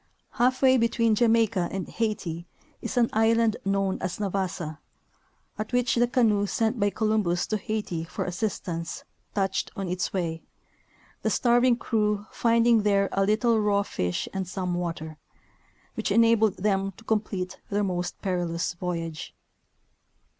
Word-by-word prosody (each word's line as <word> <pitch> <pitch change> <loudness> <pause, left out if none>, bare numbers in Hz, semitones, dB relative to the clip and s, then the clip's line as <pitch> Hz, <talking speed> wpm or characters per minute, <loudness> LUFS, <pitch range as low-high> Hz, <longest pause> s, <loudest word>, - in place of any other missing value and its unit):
Half 255 +2 +1
way 260 0 +6
between 230 -1 +2
Jamaica 225 -5 +2
and 190 -2 -4
Haiti 180 -7 -3 0.3
is - - -4
an 235 -1 +3
island 225 0 +3
known 195 -1 0
as 185 -1 -3
Navassa, 185 -6 -3 0.8
at 215 - -4
which 245 -1 +2
the 240 0 +3
canoe 220 -5 +2
sent 225 +3 0
by 205 0 +3
Columbus 210 -5 0
to 215 - -1
Haiti 205 -6 -3
for - - -4
assistance 175 -3 -3 0.3
touched 195 -2 0
on 195 -1 -3
its 180 0 -2
way, 165 -4 -2 0.8
the - - 0
starving 240 0 +4
crew 210 -3 0
finding 230 -1 +3
there 200 -1 +2
a 195 - +1
little 220 +3 +2
raw 205 -1 +2
fish 90 - -2
and 190 -1 -3
some 185 -1 -3
water, 165 -3 -4 0.8
which 220 - -2
enabled 225 -1 +4
them 195 0 0
to 225 - -17
complete 205 -4 -2
their 205 0 0
most 180 -2 -2
perilous 175 -3 -1
voyage. 165 -3 -5
200 Hz, 140 wpm, -26 LUFS, 180-225 Hz, 0.8 s, way